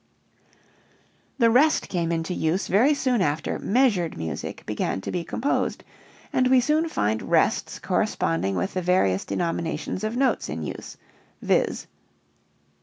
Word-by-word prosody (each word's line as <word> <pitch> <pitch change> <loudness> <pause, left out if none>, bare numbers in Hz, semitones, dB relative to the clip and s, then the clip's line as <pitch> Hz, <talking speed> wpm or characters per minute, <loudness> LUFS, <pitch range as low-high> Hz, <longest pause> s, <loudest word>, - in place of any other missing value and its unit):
The 230 -3 +4
rest 300 +6 +4
came 170 -2 -1
into 165 +2 -2
use 170 +3 0
very 250 +10 +3
soon 255 -5 +1
after 145 -3 -1
"measured 205 -8 +1
music" 80 -1 -5
began - - -2
to - - -5
be 175 -2 -2
composed 245 - -1 0.5
and 255 - +3
we 260 0 +5
soon 305 +6 +1
find 110 - 0
rests - - +1
corresponding 85 +4 0
with 190 - -2
the 185 - -1
various 170 - +2
denominations 165 +1 -2
of 215 +3 -2
notes 260 -2 +1
in 80 +1 -4
use, - - -7 0.5
viz. - - +1
180 Hz, 135 wpm, -25 LUFS, 155-250 Hz, 0.5 s, we